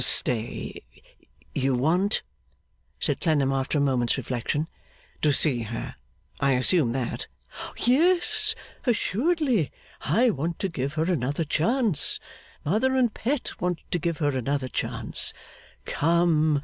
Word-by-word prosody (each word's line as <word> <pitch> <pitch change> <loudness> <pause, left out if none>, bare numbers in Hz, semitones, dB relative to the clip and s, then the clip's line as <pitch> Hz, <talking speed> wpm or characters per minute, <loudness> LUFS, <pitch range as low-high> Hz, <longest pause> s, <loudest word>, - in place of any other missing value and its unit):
'Stay! 115 -2 +1 0.7
You 130 0 +1
want,' 175 - +1 0.8
said - - 0
Clennam, 145 -6 +2
after 135 +2 0
a - - +2
moment's 130 -4 +1
reflection, 130 +4 -2 0.5
'to 150 - +4
see 135 -3 +3
her? 115 0 -5 0.5
I 140 -1 +3
assume 130 +1 +3
that?' 130 -2 -3 0.5
'Yes, 365 - +3 0.3
assuredly; 245 - +1 0.3
I 230 - +3
want 165 +1 -3
to 195 - -2
give 140 -2 -3
her 155 - +1
another 160 -2 0
chance; 195 - +2 0.5
Mother 225 - +2
and 245 -4 +2
Pet 260 +3 -1
want 180 -1 -1
to 175 - +1
give 165 0 -1
her 145 -4 0
another 130 +1 -1
chance; - - -2 0.5
come! 160 -2 +2
160 Hz, 125 wpm, -26 LUFS, 135-215 Hz, 0.8 s, to